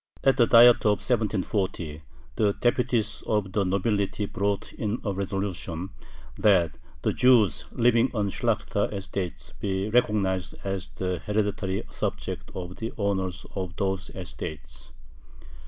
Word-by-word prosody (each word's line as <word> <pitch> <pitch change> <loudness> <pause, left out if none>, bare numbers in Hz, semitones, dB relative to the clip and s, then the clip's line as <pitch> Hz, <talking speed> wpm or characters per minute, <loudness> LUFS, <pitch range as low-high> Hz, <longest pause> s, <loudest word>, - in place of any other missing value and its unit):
At 135 -1 +4
the 120 -3 +5
Diet 120 0 +8
of 105 -3 +2
1740 95 -8 -1 0.3
the 105 -2 +2
deputies 120 -3 0
of 105 -3 0
the 100 +1 +1
nobility 100 +2 0
brought 100 0 -2
in 110 +1 -2
a 100 - 0
resolution, 95 -2 -3 0.5
that 90 -7 +3 0.2
the - - +1
Jews 110 - +4
living 120 +1 +3
on 105 -4 -1
Shlakhta 105 -3 0
estates 95 -3 -5
be 95 +1 -1
recognized 100 -6 +1
as 95 -1 -3
the 90 -1 -3
"hereditary 100 -2 -1
subjects" - - -4
of 90 0 -6
the 115 0 -4
owners 95 -3 -1
of 95 -3 -4
those 95 -2 -1
estates. 75 - -8
100 Hz, 125 wpm, -26 LUFS, 95-110 Hz, 0.5 s, Diet